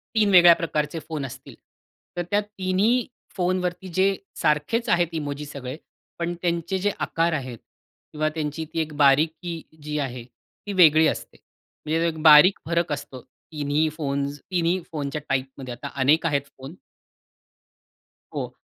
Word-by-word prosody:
3 215 Hz, -2 st, +3 dB
वेगळ्या 175 Hz, -2 st, +9 dB
प्रकारचे 150 Hz, -1 st, -2 dB
फोन 155 Hz, -4 st, -3 dB
असतील, 135 Hz, 0 st, -10 dB, 0.6 s
तर 175 Hz, -, 0 dB
त्या 205 Hz, 0 st, +3 dB
तिन्ही 205 Hz, +4 st, 0 dB, 0.3 s
फोनवरती 180 Hz, 0 st, -1 dB
जे 190 Hz, +1 st, +4 dB, 0.3 s
सारखेच 150 Hz, +11 st, +1 dB
आहेत 175 Hz, 0 st, +3 dB
इमोजी 150 Hz, -2 st, -4 dB
सगळे, 140 Hz, -1 st, -7 dB, 0.4 s
पण 170 Hz, 0 st, -1 dB
त्यांचे 170 Hz, +1 st, -1 dB
जे 205 Hz, +2 st, +1 dB
आकार 165 Hz, +1 st, 0 dB
आहेत 130 Hz, -5 st, -4 dB, 0.6 s
किंवा 155 Hz, 0 st, 0 dB
त्यांची 155 Hz, 0 st, -3 dB
ती 165 Hz, -, -1 dB
एक 155 Hz, -1 st, -4 dB
बारीकी 160 Hz, +4 st, +2 dB, 0.2 s
जी 150 Hz, 0 st, -3 dB
आहे 125 Hz, -4 st, -4 dB
ती 125 Hz, -, -12 dB
वेगळी 160 Hz, -4 st, +6 dB
असते. -, -, -4 dB, 0.5 s
म्हणजे 165 Hz, +2 st, +1 dB
एक 160 Hz, -2 st, -4 dB
बारीक 155 Hz, +4 st, +8 dB
फरक 170 Hz, -1 st, 0 dB
असतो. 140 Hz, -3 st, -7 dB
तिन्ही 150 Hz, +3 st, -2 dB
फोन्स 140 Hz, -1 st, -2 dB
तिन्ही 175 Hz, 0 st, +1 dB
फोनच्या 150 Hz, -1 st, -4 dB
टाइपमध्ये 130 Hz, -1 st, -3 dB
आता 125 Hz, +4 st, -7 dB
अनेक 150 Hz, +5 st, +4 dB
आहेत 145 Hz, -3 st, +1 dB, 0.2 s
फोन. 135 Hz, +5 st, -10 dB, 1.6 s
हो. -, -, -4 dB
155 Hz, 140 wpm, -24 LUFS, 145-175 Hz, 1.6 s, वेगळ्या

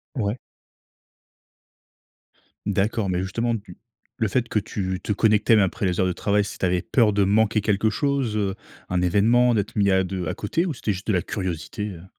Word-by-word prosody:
Ouais. 110 Hz, -1 st, -1 dB, 2.3 s
D'accord, 100 Hz, +1 st, 0 dB
mais 90 Hz, -, 0 dB
justement 115 Hz, +5 st, -1 dB
tu 100 Hz, -4 st, -9 dB, 0.4 s
le 115 Hz, -, +1 dB
fait 120 Hz, +3 st, 0 dB
que -, -, 0 dB
tu 95 Hz, -3 st, -3 dB
te -, -, -3 dB
connecte 105 Hz, +1 st, +2 dB
même 110 Hz, -, +7 dB
après 95 Hz, 0 st, 0 dB
les 90 Hz, -1 st, 0 dB
heures 95 Hz, -, +3 dB
de 90 Hz, -, -1 dB
travail, 100 Hz, +3 st, +1 dB
c'est -, -, -7 dB
tu -, -, -1 dB
avais 90 Hz, -1 st, +1 dB
peur 115 Hz, -5 st, +2 dB
de 100 Hz, 0 st, +3 dB
manquer 110 Hz, +2 st, +3 dB
quelque 105 Hz, +1 st, +1 dB
chose, 135 Hz, -3 st, -1 dB
heu, 100 Hz, -2 st, -1 dB, 0.3 s
un 90 Hz, -1 st, 0 dB
événement, 115 Hz, +7 st, +4 dB
d'être 110 Hz, +1 st, -2 dB
mis 100 Hz, -2 st, +3 dB
à 95 Hz, 0 st, +3 dB
de 90 Hz, -1 st, -4 dB
à -, -, -2 dB
côté 165 Hz, -, -1 dB
ou 165 Hz, -, -2 dB
c'était 110 Hz, -3 st, -2 dB
juste 95 Hz, +3 st, -8 dB
de 110 Hz, -, +2 dB
la 90 Hz, -, +2 dB
curiosité, 95 Hz, +2 st, -4 dB
heu? 85 Hz, 0 st, -11 dB
105 Hz, 200 wpm, -24 LUFS, 95-110 Hz, 2.3 s, même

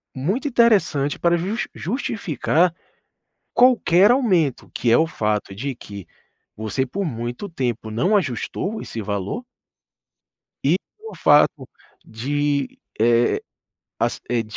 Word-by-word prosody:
muito 190 Hz, -, -1 dB
interessante 200 Hz, -, +2 dB
para 170 Hz, 0 st, +3 dB
just 200 Hz, +7 st, -2 dB
justificar 180 Hz, -, 0 dB, 0.8 s
qualquer 220 Hz, -5 st, +5 dB
aumento, 185 Hz, -, +1 dB
que 120 Hz, -, 0 dB
é 115 Hz, -, +6 dB
o 160 Hz, -, +4 dB
fato 105 Hz, -8 st, -2 dB
de 135 Hz, +4 st, -4 dB
que 100 Hz, -6 st, -10 dB, 0.5 s
você 110 Hz, +5 st, -2 dB
por 195 Hz, +10 st, -3 dB
muito 120 Hz, -, -4 dB
tempo 120 Hz, -7 st, -3 dB
não 180 Hz, -, +2 dB
ajustou 190 Hz, -, -3 dB
esse 115 Hz, -, -6 dB
valor 100 Hz, -, -3 dB, 1.2 s
e -, -, +4 dB, 0.2 s
o 445 Hz, 0 st, -10 dB
fato -, -, +4 dB, 0.4 s
de, 140 Hz, +4 st, -1 dB
eh, -, -, -24 dB, 1.2 s
as -, -, -1 dB
eh, 120 Hz, -2 st, +1 dB
145 Hz, 115 wpm, -22 LUFS, -, 1.2 s, é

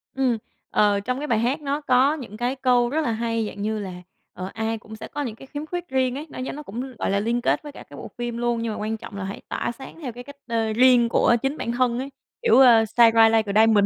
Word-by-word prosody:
Ừm, 260 Hz, -3 st, +1 dB, 0.3 s
ờ, 205 Hz, -1 st, +3 dB
trong 250 Hz, +5 st, -2 dB
cái 295 Hz, +2 st, -4 dB
bài 230 Hz, -5 st, +2 dB
hát 255 Hz, +7 st, 0 dB
nó 285 Hz, +1 st, -2 dB
có 265 Hz, +1 st, +3 dB
những 235 Hz, -8 st, -9 dB
cái 245 Hz, +3 st, -1 dB
câu 250 Hz, -2 st, +2 dB
rất 310 Hz, +5 st, 0 dB
là 250 Hz, -, 0 dB
hay, 230 Hz, 0 st, -1 dB
dạng 205 Hz, -, -8 dB
như 215 Hz, +1 st, -1 dB
là, 195 Hz, -3 st, -5 dB, 0.4 s
ờ, 185 Hz, +1 st, -6 dB
ai 225 Hz, 0 st, -2 dB
cũng 220 Hz, 0 st, -11 dB
sẽ 220 Hz, -, -8 dB
có 295 Hz, -, -5 dB
những 240 Hz, -6 st, -4 dB
cái 270 Hz, -, -13 dB
khiếm 290 Hz, +2 st, -6 dB
khuyết 350 Hz, +2 st, -5 dB
riêng 260 Hz, -1 st, +1 dB
ấy, 295 Hz, +3 st, -6 dB
nó -, -, -9 dB
giống 255 Hz, -, -4 dB
nó 300 Hz, -, -7 dB
cũng, 255 Hz, +2 st, -6 dB
gọi -, -, -1 dB
là, 200 Hz, -, +2 dB
liên 235 Hz, +3 st, 0 dB
kết -, -, +1 dB
với 295 Hz, -, -8 dB
cả -, -, -11 dB
cái -, -, -11 dB
bộ -, -, -8 dB
phim 240 Hz, -1 st, -3 dB
luôn, 240 Hz, -1 st, 0 dB
nhưng 230 Hz, -1 st, -2 dB
mà -, -, -6 dB
quan 220 Hz, +1 st, -2 dB
trọng 210 Hz, -, -10 dB
là 200 Hz, -, -4 dB
hãy 195 Hz, +1 st, -6 dB
tỏa -, -, -2 dB
sáng 265 Hz, +6 st, -11 dB
theo 260 Hz, -5 st, -4 dB
cái 245 Hz, +1 st, -9 dB
cách, 285 Hz, +2 st, -12 dB
ơ, 225 Hz, -2 st, 0 dB
riêng 245 Hz, 0 st, +5 dB
của 235 Hz, -, +4 dB
chính 270 Hz, +3 st, -1 dB
bản 235 Hz, -, -3 dB
thân 245 Hz, 0 st, +1 dB
ấy, 270 Hz, -, -4 dB, 0.3 s
kiểu, 470 Hz, -, +5 dB
ơ, 235 Hz, -4 st, +7 dB
shine 230 Hz, +1 st, +5 dB
bright 225 Hz, 0 st, +6 dB
like 220 Hz, -2 st, +2 dB
a 215 Hz, -, +7 dB
diamond. 220 Hz, -2 st, +5 dB
240 Hz, 290 wpm, -24 LUFS, 220-265 Hz, 0.4 s, ơ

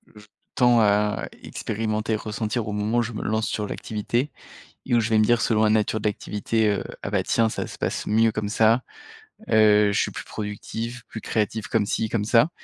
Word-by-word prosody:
je 105 Hz, 0 st, -14 dB, 0.3 s
tends 120 Hz, -2 st, +5 dB
à 105 Hz, 0 st, +2 dB, 0.2 s
expérimenter, 110 Hz, 0 st, -2 dB
ressentir 110 Hz, +1 st, -3 dB
au 105 Hz, -, -3 dB
moment 105 Hz, +3 st, 0 dB
où -, -, +3 dB
je 115 Hz, 0 st, -3 dB
me 105 Hz, -, -5 dB
lance 110 Hz, +1 st, 0 dB
sur 105 Hz, -1 st, -2 dB
l'activité 120 Hz, +8 st, -2 dB, 0.5 s
et 120 Hz, -, +1 dB
où 120 Hz, -, +5 dB
je 110 Hz, 0 st, 0 dB
vais 110 Hz, -, +3 dB
me 110 Hz, -, +5 dB
dire, 120 Hz, +2 st, +3 dB
selon 110 Hz, -1 st, +2 dB
la 110 Hz, -, +4 dB
nature 110 Hz, 0 st, +1 dB
de 105 Hz, -, -1 dB
l'activité, 105 Hz, +1 st, 0 dB
heu: 100 Hz, -, 0 dB, 0.2 s
«Ah, -, -, -3 dB
bah, -, -, +1 dB
tiens, 115 Hz, -1 st, +2 dB
ça -, -, -4 dB
se -, -, -10 dB
passe -, -, -2 dB
mieux 110 Hz, +1 st, +3 dB
comme 105 Hz, -1 st, -3 dB
ça, 115 Hz, +3 st, +3 dB, 0.7 s
heu, 105 Hz, -2 st, +5 dB
je -, -, +2 dB
suis -, -, 0 dB
plus -, -, -7 dB
productif, 110 Hz, +3 st, -5 dB
plus 110 Hz, -, -7 dB
créatif 110 Hz, -1 st, -2 dB
comme 110 Hz, -3 st, +1 dB
ci, 110 Hz, +1 st, -1 dB
comme 105 Hz, -2 st, -1 dB
ça» 115 Hz, +7 st, +4 dB
110 Hz, 215 wpm, -24 LUFS, 105-115 Hz, 0.7 s, tends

